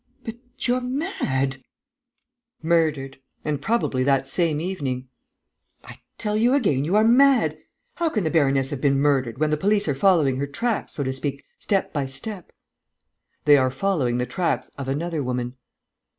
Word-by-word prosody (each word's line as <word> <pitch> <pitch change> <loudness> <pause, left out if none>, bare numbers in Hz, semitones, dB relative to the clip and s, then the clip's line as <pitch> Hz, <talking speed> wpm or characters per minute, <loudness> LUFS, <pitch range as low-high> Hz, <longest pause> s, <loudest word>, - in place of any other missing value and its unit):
But 225 - -5 0.3
you're 250 +1 +1
mad!" 245 - -2 1.1
"Murdered... 155 -5 0 0.3
and 145 -2 -2
probably 180 - 0
that 135 0 +2
same 165 -4 +1
evening." 140 -8 -3 0.8
"I - - -12 0.2
tell 210 -1 -2
you 240 +5 +3
again, 170 - +1
you 175 +6 0
are 215 - +5
mad! 265 +2 +4 0.4
How 340 -1 +1
can 215 -9 -1
the 160 - 0
baroness 135 -4 +2
have 140 -3 -4
been 140 -2 +2
murdered, 135 -5 +1
when 155 +1 +1
the 150 - +2
police 200 +4 +1
are 145 - +1
following 145 -4 +3
her 140 +1 -2
tracks, 225 +11 -2
so 145 - -3
to 130 0 -2
speak, 140 +1 -4 0.2
step 195 -2 -1
by 140 -3 -1
step?" 175 +8 -6 0.9
"They 145 -1 +7
are 130 -1 +2
following 130 -4 0
the 125 - 0
tracks 130 -6 -2
of 140 -2 -6
another 155 +3 -2
woman." 125 -1 -3
150 Hz, 165 wpm, -23 LUFS, 135-195 Hz, 1.1 s, They